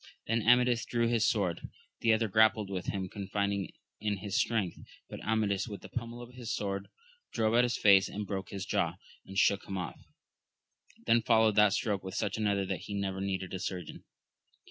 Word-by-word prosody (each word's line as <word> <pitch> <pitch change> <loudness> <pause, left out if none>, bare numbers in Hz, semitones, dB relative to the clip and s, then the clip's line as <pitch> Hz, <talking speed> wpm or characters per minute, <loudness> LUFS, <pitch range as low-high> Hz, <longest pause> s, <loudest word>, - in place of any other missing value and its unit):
Then 115 +1 +1
Amadis 125 0 +4
drew 120 -1 0
his 115 -2 +2
sword; 95 -6 0 0.4
the 115 - +3
other 110 0 +2
grappled 110 -1 +3
with 90 -2 -4
him, 95 -2 -2
confiding 100 0 -2 0.3
in 105 -1 -1
his 95 0 -5
strength, 110 -7 0 0.3
but - - -8
Amadis 105 -2 0
with 105 -3 -7
the - - -11
pummel 120 0 -5
of 120 +1 -13
his 120 -2 -6
sword 100 -1 -2 0.4
drove 110 -1 +1
at 120 +1 +5
his 120 -1 0
face 100 -2 +6
and 105 +1 -4
broke 95 -2 -4
his 100 -1 -5
jaw, - - 0 0.3
and 95 - -8
shook 100 0 +3
him 95 - -4
off; 90 - -5 1.0
then 115 +1 +4
followed 110 -1 +4
that 105 -2 +6
stroke 100 -4 -1
with 95 0 -6
such 105 -3 -1
another, 100 -3 0
that 95 -1 -3
he 100 - -4
never 95 -1 -2
needed 95 -1 -3
a 95 - -3
surgeon. 90 -3 -5
105 Hz, 190 wpm, -31 LUFS, 95-115 Hz, 1.0 s, face